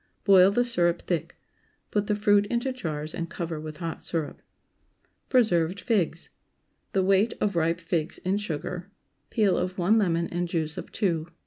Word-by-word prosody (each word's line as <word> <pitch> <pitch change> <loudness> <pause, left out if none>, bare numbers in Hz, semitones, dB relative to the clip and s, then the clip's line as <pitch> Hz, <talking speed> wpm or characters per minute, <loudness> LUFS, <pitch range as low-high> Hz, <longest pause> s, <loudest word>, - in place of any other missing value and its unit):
Boil 190 -2 +7
the 245 +5 +2
syrup 175 -8 +1
thick. 175 -3 -3 0.5
Put 205 -1 0
the 210 - +1
fruit 205 -1 +3
into 240 +4 -1
jars 155 -9 -4
and 170 -1 -4
cover 165 -2 -4
with 155 -1 -7
hot 165 -1 -5
syrup. 160 -3 -3 0.9
PRESERVED 185 -7 +2
FIGS. 180 -8 0 0.6
✠ - - -45
The 190 - +2
weight 195 +4 +3
of 200 -3 0
ripe 165 +1 +1
figs 170 -1 -2
in 190 +2 -1
sugar. 180 0 -4 0.4
Peel 210 -4 +2
of 185 +1 -2
one 200 +5 +3
lemon 170 -4 +1
and 175 0 -2
juice 160 -2 -2
of - - -7
two. 165 -5 0
180 Hz, 165 wpm, -27 LUFS, 165-205 Hz, 0.9 s, Boil